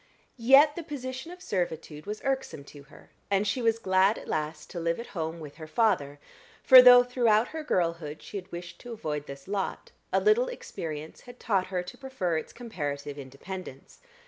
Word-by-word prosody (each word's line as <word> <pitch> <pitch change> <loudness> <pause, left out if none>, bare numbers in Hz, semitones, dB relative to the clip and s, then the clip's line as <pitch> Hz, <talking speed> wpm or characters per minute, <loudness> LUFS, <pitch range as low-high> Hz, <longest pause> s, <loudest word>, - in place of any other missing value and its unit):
Yet 275 +5 +6
the 345 - -4
position 260 -1 -6
of 360 0 -12
servitude 165 -3 -3
was 210 +1 -5
irksome 265 - -2
to 145 - -11
her, - - -18 0.2
and 200 +1 +2
she 210 +5 -1
was 225 -1 +2
glad 190 0 +3
at - - -10
last 150 0 -3
to 175 - -5
live 170 +2 -1
at 235 - -6
home 165 -2 -3
with 150 -2 -10
her 155 -2 -9
father, 155 -7 +1 0.5
for 260 -1 +10
though, 245 0 +9
throughout 240 -3 +2
her 315 -1 -6
girlhood, 170 - -2
she - - -7
had 190 0 -9
wished 175 0 -8
to 245 -1 -8
avoid 150 -9 -4
this 140 +2 -10
lot, 200 -1 -3 0.2
a - - +3
little 435 +4 +3
experience 160 - -7
had 245 0 -14
taught 195 -5 0
her 185 -1 -2
to 180 - -10
prefer 260 -11 -2
its 160 - -4
comparative 145 - -5
independence. 140 +2 -9
190 Hz, 190 wpm, -28 LUFS, 155-245 Hz, 0.5 s, for